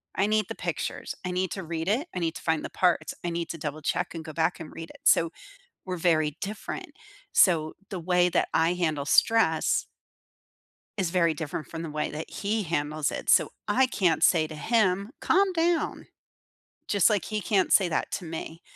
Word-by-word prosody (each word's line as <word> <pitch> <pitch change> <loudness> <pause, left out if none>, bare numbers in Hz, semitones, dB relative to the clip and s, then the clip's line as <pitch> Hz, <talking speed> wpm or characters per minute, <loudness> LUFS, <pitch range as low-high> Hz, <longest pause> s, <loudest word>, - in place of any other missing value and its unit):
I 195 - +2
need 215 -2 +1
the - - -4
pictures. - - -4
I 180 - -2
need 185 0 -1
to 190 - -4
read 165 0 -4
it. 245 - +1
I - - -1
need 165 -1 -1
to - - -7
find 160 -1 0
the - - -5
parts. 180 -2 +1
I 175 - -1
need 170 0 -3
to 165 - -6
double 150 0 -5
check 180 +4 -1
and 165 -1 -6
go 155 - -7
back 165 +2 0
and 155 - -9
read 165 0 -8
it. - - -14
So, 165 -1 +5 0.5
we're 185 -1 -3
very 155 -3 +2
different. 205 +1 -5 0.4
So, 160 -4 +4 0.2
the 190 - -4
way 180 +1 +3
that - - +1
I 165 +2 +3
handle 155 -5 -1
stress 160 -1 +3 1.1
is 185 -4 0
very 170 -3 +2
different 155 0 -5
from 165 0 -6
the 165 - -5
way 150 0 -2
that 155 +2 -6
he 210 +1 -2
handles 155 -2 -1
it. - - -6
So - - +5 0.2
I 265 - +4
can't 180 -10 +1
say 165 -1 +5
to 155 - -9
him, 200 +2 +1
"Calm 385 +2 +3
down." 335 -1 0 0.8
Just 200 0 +4
like 205 -5 0
he 215 -1 -2
can't 190 0 +1
say 195 - +5
that 165 - -2
to 180 - -3
me 165 +1 -7
170 Hz, 200 wpm, -27 LUFS, 160-195 Hz, 1.1 s, So